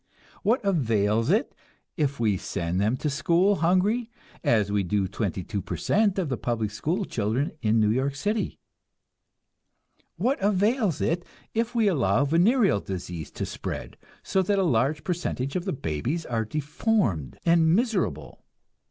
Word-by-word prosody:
What 225 +2 +1
avails 115 - +1
it 210 +6 +2 0.4
if 140 -4 -1
we 110 -4 +2
send 90 0 -2
them 110 +5 +1
to 150 - -3
school 170 +7 +2
hungry, 200 +7 +2 0.3
as 105 -3 +2
we 105 0 +2
do 95 +1 0
twenty 95 -2 -3
two 100 +3 -3
per - - -5
cent 205 -1 +2
of 185 -4 0
the 130 -3 -2
public 115 -3 -2
school 170 - -1
children 115 +5 -1
of 110 -1 +2
New 105 -2 +3
York 135 +4 0
City? 210 +8 -2 1.6
What 265 0 0
avails 205 - +1
it 170 +2 0 0.3
if 230 +2 -1
we 225 -3 +3
allow 130 - +2
venereal 190 - +3
disease 90 -5 -6
to - - -3
spread, - - -6 0.3
so 190 - +1
that 200 +2 +1
a 195 - +3
large 145 0 +1
percentage 165 -7 -2
of 180 0 -1
the 190 - -1
babies 130 - -3
are 115 -2 -1
deformed 145 - -1
and 165 -1 +4
miserable? 185 - -1
145 Hz, 150 wpm, -26 LUFS, -, 1.6 s, and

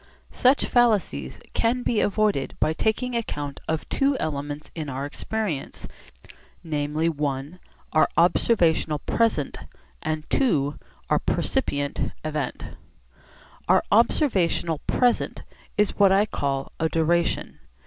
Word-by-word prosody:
Such 260 +3 +3
fallacies 205 - +1
can 245 +2 +1
be 230 -3 +1
avoided 205 -8 +1
by 155 - +2
taking 225 +7 -1
account 145 -11 -3
of 160 -1 -2
two 275 0 +1
elements 145 - -4
in 155 -3 -5
our 135 +1 -3
experience, 180 0 -4 0.8
namely, 155 0 -1
(i) 145 +1 -2 0.3
our 155 - +4
observational 170 -3 +3
'present,' 215 -3 0 0.4
and 155 0 -2
(ii) 145 - +2 0.4
our - - +2
'percipient 145 - -1
event.' 150 -4 -3 1.0
Our - - +4
observational 190 - +2
'present' 245 -1 +1 0.3
is 210 -1 +1
what 200 -2 +6
I 195 +2 +4
call 140 -8 -2
a 160 - +1
'duration.' 170 +1 0
165 Hz, 110 wpm, -25 LUFS, 145-220 Hz, 1.0 s, what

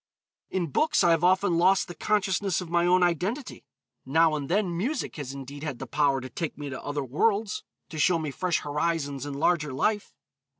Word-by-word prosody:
In 175 -5 -2
books, 310 - +2
I 170 - +5
have 165 0 +2
often 185 -1 +3
lost 185 +2 +4
the 175 - -7
consciousness 195 0 0
of 175 -3 -7
my 170 0 +3
own 180 0 +4
identity; 185 - -2 0.4
now 160 +4 +3
and 145 -1 -3
then 185 -1 +1
music 250 - -2
has 140 -3 -5
indeed 140 +1 -8
had 150 -5 -4
the - - -6
power 145 -2 +1
to 130 - -7
take 165 +5 -4
me 145 -1 -6
to 130 - -6
other 145 -1 -2
worlds, 200 - 0 0.3
to 155 - -6
show 175 +3 +4
me 155 -3 -3
fresh 180 +4 -1
horizons 145 -2 -2
and 140 - -5
larger 150 0 +1
life. 205 +11 -1
165 Hz, 200 wpm, -27 LUFS, 145-185 Hz, 0.4 s, I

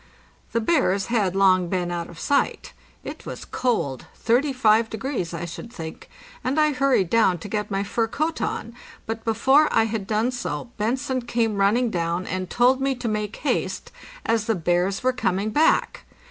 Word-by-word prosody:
The 230 - +1
bears 220 - +2
had 195 -5 +1
long 185 -2 +4
been 180 -1 -1
out 170 -1 -4
of 170 - -12
sight. 280 - 0 0.3
It - - -8
was - - -7
cold, 170 - -1
35 230 -3 +2
degrees 220 -6 -3
I 170 0 -4
should 170 +7 -8
think, 160 -5 -8 0.3
and 270 +4 0
I 305 0 +4
hurried 265 -8 +2
down 220 -6 +4
to 170 - -8
get 210 0 -2
my 195 -1 -1
fur 225 +3 0
coat 310 +8 -2
on, 230 - -3 0.3
but 225 0 -4
before 265 +7 +4
I - - +4
had 220 -3 -3
done 220 +4 +1
so 245 -1 -4
Bentzen 255 +3 -1
came 225 -3 0
running 220 +5 +2
down 170 +1 -1
and 185 -1 -3
told 255 +2 +3
me 270 0 +1
to 245 - -4
make 210 -1 -2
haste, 295 - -2 0.3
as 225 -2 +1
the 225 - +1
bears 180 +4 0
were 255 0 +2
coming 210 -4 -1
back. 305 +7 +2
220 Hz, 175 wpm, -24 LUFS, 185-250 Hz, 0.3 s, long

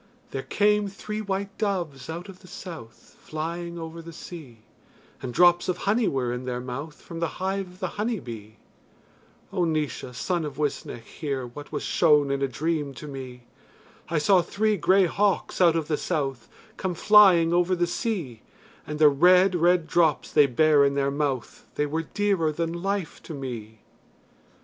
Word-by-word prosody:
There 135 - -3
came 210 +5 +2
three 210 +2 -5
white 200 -1 -3
doves 175 -11 -2
out 170 +3 -6
of 190 -2 -12
the 185 - -16
South 165 -12 -10
Flying 170 +2 -5
over 165 0 -7
the 170 0 -10
sea, 150 -9 -11 0.6
And 130 -2 -4
drops 175 +5 +4
of 180 - 0
honey 215 +4 +1
were 125 -3 -1
in 125 +1 -5
their 125 -1 -3
mouth 135 +5 -6
From 165 - -9
the 170 - 0
hive 190 +1 -2
of 180 +1 -16
the 185 - 0
honey 225 -1 -1
bee. 110 -4 -9 1.0
O 180 - +1
Naois, 155 -6 -2
son 170 +8 -1
of 145 -3 -6
Uisnech, 145 -5 -3
hear, 140 -5 -4
What 145 +5 -10
was - - -3
shown 150 -4 +3
in 140 0 -1
a 135 - +2
dream 145 +2 -2
to 150 - -9
me. 130 -3 -8 0.7
I 165 - 0
saw 180 +5 +4
three 215 +4 0
grey 185 +2 +4
hawks 200 +2 0
out 170 -2 +6
of 160 -2 -1
the 155 -2 0
south 135 -7 -3 0.3
Come 185 -2 -2
flying 185 -4 +6
over 175 +1 +3
the 175 0 +1
sea, 170 - -3 0.5
And 150 - -4
the 155 0 +7
red 180 +6 +5
red 175 0 +3
drops 160 -4 +2
they 145 - +5
bare 145 +3 +4
in 140 0 +2
their 140 0 +1
mouth 140 -4 -3
They 150 - +1
were 155 +3 -2
dearer 195 -6 +2
than 165 +2 -2
life 195 0 -3
to 160 - -8
me. 115 -6 -7
165 Hz, 180 wpm, -26 LUFS, 140-185 Hz, 1.0 s, the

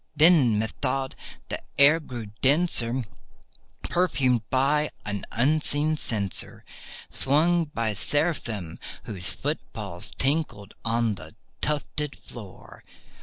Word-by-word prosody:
Then, 150 -8 +5
methought, 130 +4 -2 0.4
the - - -4 0.2
air 145 +3 +6
grew 120 -8 -8
denser, 130 -5 +2 0.8
perfumed 135 -9 +1
from 145 +3 +1 0.2
an 100 -1 -4
unseen 150 +4 +1
censer 105 -9 -1 0.5
Swung 165 +5 +3
by 115 -7 -2
Seraphim 110 - -1 0.2
whose 95 -5 +7
foot - - -3 0.2
falls - - -5
tinkled 135 -8 -2
on 115 -1 0
the 80 -4 -11 0.3
tufted 150 -1 -2
floor. 105 -6 -12
130 Hz, 100 wpm, -25 LUFS, 110-150 Hz, 0.8 s, whose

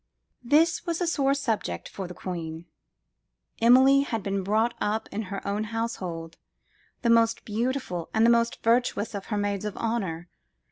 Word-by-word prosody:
This 315 +7 +3
was 335 -1 -1
a 355 - 0
sore 275 -4 +2
subject 245 -6 -2
for 190 -2 -6
the 180 - -9
queen. 165 -3 -6 1.0
Emilie 260 +4 +6
had 225 -7 -3
been 195 0 -1
brought 220 +5 +1
up 215 +2 -1
in 210 - -3
her 195 0 -5
own 205 +2 -1
household, 185 -8 -4 0.7
the 235 - +2
most 230 0 +3
beautiful 225 -6 -2
and 220 +1 +3
the - - +6
most 235 0 +1
virtuous 230 -2 +1
of 200 -1 -6
her 210 - -2
maids 205 -1 -1
of 210 -1 -4
honour. 190 -8 -2
220 Hz, 160 wpm, -26 LUFS, 195-240 Hz, 1.0 s, Emilie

